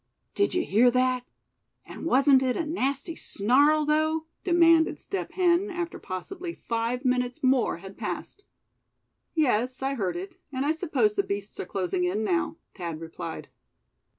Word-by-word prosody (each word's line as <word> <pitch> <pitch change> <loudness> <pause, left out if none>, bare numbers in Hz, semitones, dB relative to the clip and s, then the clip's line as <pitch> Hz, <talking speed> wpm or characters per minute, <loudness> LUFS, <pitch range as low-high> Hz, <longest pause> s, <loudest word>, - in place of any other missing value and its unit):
"Did 400 -3 +1
you 360 - +1
hear 230 +5 +5
that 255 0 +1 0.6
and - - -7
wasn't 270 -1 +5
it 255 -1 0
a 335 - -1
nasty 285 0 -2
snarl, 290 +9 +3
though?" 315 +1 +1 0.2
demanded 335 -2 +4
Step 390 - -5
Hen 360 +2 +2
after 350 -2 -4
possibly 340 - -6
five 235 +3 -2
minutes 250 0 0
more 260 -6 +2
had 190 +2 -12
passed. 405 - -5 0.9
"Yes, 255 -4 +1
I 270 +1 0
heard 200 -9 -2
it, 370 0 -7
and 265 0 -2
I 300 - +3
suppose 265 -9 +1
the 200 - +2
beasts 200 +1 -5
are - - -4
closing 180 -1 -1
in 200 +5 -1
now," 170 -4 0 0.2
Thad 170 -5 -5
replied. 165 0 -7
260 Hz, 150 wpm, -27 LUFS, 215-320 Hz, 0.9 s, hear